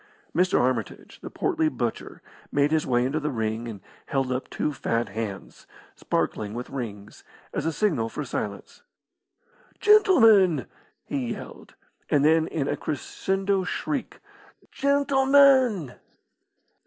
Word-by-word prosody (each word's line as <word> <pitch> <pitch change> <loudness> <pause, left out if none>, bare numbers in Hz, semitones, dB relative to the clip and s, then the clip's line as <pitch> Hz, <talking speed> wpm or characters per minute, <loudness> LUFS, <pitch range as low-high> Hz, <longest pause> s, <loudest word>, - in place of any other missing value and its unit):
Mr. 180 +2 +3
Armitage, 120 -4 -2
the - - -7
portly 160 -1 0
butcher, 120 -4 -5 0.3
made 145 +1 +2
his 160 -1 +1
way 120 -1 +2
into 140 +4 -1
the 150 0 -2
ring 110 -2 -3
and 105 -4 -8 0.3
held 135 -2 -1
up 125 +1 -3
two 150 - -2
fat 115 -4 -1
hands, 105 -2 -7 0.3
sparkling 105 0 -2
with 125 +1 -6
rings, 105 -6 -7 0.3
as - - -2
a - - +1
signal 155 - 0
for - - -5
silence. - - -6 1.0
"Gentlemen!" 225 - +5 0.4
he 125 -4 -3
yelled. - - -11 0.3
And 145 -1 +3
then 160 +1 +4
in 145 -4 -2
a 145 - 0
crescendo 190 +7 -2
shriek, 275 +8 -4 0.5
"Gentlemen!" 270 - +3
145 Hz, 125 wpm, -25 LUFS, 120-200 Hz, 1.0 s, Gentlemen